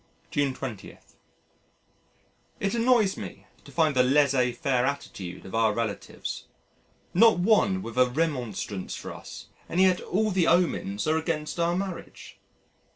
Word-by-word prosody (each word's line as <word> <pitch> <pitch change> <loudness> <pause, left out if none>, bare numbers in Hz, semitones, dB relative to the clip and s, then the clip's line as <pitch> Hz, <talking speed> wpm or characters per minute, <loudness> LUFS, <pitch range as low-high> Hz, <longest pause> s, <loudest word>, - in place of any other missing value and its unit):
June 145 -1 +1
20.... 120 -8 -7 1.6
It 195 - -1
annoys 230 -4 +3
me - - -8 0.2
to - - -14
find 155 -4 +2
the 130 - +5
laissez 130 -1 +3
faire 125 0 0
attitude 100 -10 -4
of 95 - -10
our 115 -1 +3
relatives. 115 -3 -4 0.7
Not 225 +3 +6
one 190 0 +3
with 115 +2 -4
a 125 0 +5
remonstrance 125 - -2
for - - -7
us - - -10 0.2
and 175 - -1
yet 185 -1 +4
all 215 +3 0
the 180 -3 +2
omens 165 - +1
are 155 +1 +2
against 160 0 -3
our 170 +1 +2
marriage. 190 -1 -6
150 Hz, 140 wpm, -27 LUFS, 125-185 Hz, 1.6 s, Not